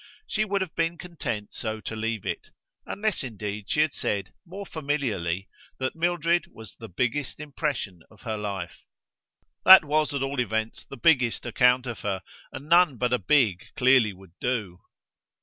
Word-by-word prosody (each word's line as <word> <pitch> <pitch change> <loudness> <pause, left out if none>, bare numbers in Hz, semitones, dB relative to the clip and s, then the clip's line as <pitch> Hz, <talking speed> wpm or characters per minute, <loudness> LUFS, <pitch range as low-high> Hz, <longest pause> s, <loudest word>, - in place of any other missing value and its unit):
She 215 - 0
would 200 -1 0
have 185 -4 -4
been 165 +1 0
content 125 -12 -5
so 110 -1 -3
to 110 - -5
leave 110 -1 -3
it; - - -4 0.4
unless 210 -5 -1
indeed 105 -4 -5
she 150 - +3
had 155 -2 +2
said, 100 -3 -2
more 195 +3 -7
familiarly, 115 - -2 0.3
that 130 0 -2
Mildred 170 0 +1
was 110 -4 -11
the 115 - -10
biggest 125 +9 -2
impression 145 - -3
of 110 - -19
her 110 -2 -3
life. 100 -4 -5 0.8
That 190 -4 +10
was 150 +1 +1
at 140 -2 -1
all 135 0 -2
events 110 -1 -2
the 135 - -8
biggest 125 -4 +3
account 125 +1 +3
of 120 -3 -5
her, 95 -2 -3 0.3
and 140 - -8
none 170 -5 +5
but 125 +1 0
a 125 - +2
big 105 -4 +2
clearly 125 -4 +5
would 95 -3 -16
do. 105 -8 -2
125 Hz, 165 wpm, -26 LUFS, 105-150 Hz, 0.8 s, That